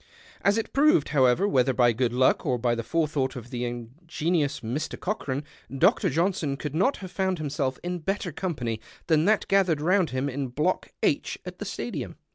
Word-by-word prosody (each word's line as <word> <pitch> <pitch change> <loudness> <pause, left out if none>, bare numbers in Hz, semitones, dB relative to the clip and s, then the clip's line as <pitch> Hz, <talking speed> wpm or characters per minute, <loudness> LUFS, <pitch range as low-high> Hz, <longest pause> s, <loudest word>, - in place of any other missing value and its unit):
As 200 +2 +3
it 225 - -3
proved, 275 - +4
however, 135 +6 +3
whctiier 130 -7 +2
by 120 -2 +4
good 120 +1 0
luck 130 +2 +3
or 125 -3 +1
by 120 0 +1
the 115 - -2
forethought 145 -2 -1
of 120 -1 -9
the 125 0 -2
ingenious 145 +5 -2
Mr. 125 +7 -3
Cochran, 145 -8 -2 0.3
Dr. 180 - +3
JohiiS(^n 165 -4 0
could 145 0 -5
not 195 - +2
have 180 - -9
found 190 0 0
himself 145 -3 -2
in 180 0 -3
better 190 +1 -2
company 125 - -3 0.2
than 160 -1 +3
that 215 +1 +2
gathered 185 -6 +3
round 180 +3 +2
hinj 130 +2 -1
in 135 +1 -3
Block 150 +9 -1
H - - +1
at - - -8
the - - -4
Stadium. - - -5
150 Hz, 185 wpm, -26 LUFS, 130-180 Hz, 0.3 s, proved